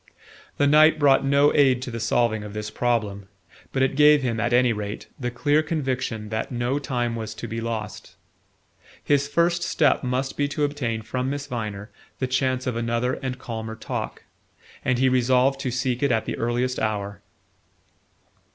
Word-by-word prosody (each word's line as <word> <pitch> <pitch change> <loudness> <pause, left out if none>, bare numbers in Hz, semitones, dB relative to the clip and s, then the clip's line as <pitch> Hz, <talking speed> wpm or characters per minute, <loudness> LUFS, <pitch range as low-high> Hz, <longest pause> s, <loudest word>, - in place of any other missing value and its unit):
The 145 - +3
night 155 +2 +6
brought 140 -3 +4
no 140 +1 +4
aid 135 -4 +4
to 125 - -5
the 115 - -5
solving 115 -1 +1
of 105 -1 -8
this 105 0 -5
problem; 105 -5 -1 0.4
but 135 - +1
it 135 0 +1
gave 150 -1 +6
him, 115 -3 -1
at 115 +1 0
any 125 -1 +4
rate, 105 -1 -5
the 125 -2 -2
clear 145 +5 +2
conviction 130 -8 -3
that 110 +4 -3
no 125 +3 -1
time 120 -4 -2
was 110 -1 -5
to - - -6
be 115 +1 -4
lost. 115 -2 -5 0.9
His 140 -1 +2
first 170 +3 +1
step 150 -4 +2
must 130 +1 -2
be 145 - +1
to 145 +1 -2
obtain 125 -6 -2
from 125 +4 -2
Miss 140 0 -3
Viner 110 -5 -5 0.3
the 130 - -1
chance 130 0 0
of 125 - -2
another 115 +2 0
and 130 -1 -3
calmer 110 -2 -6
talk; 110 - -5 0.6
and 130 -1 +1
he 130 +1 +3
resolved 130 +1 +3
to 135 - -2
seek 125 0 -1
it 140 -2 +2
at 115 -2 +1
the - - -3
earliest 120 +2 -1
hour. 105 -2 -3
125 Hz, 180 wpm, -24 LUFS, 115-135 Hz, 0.9 s, night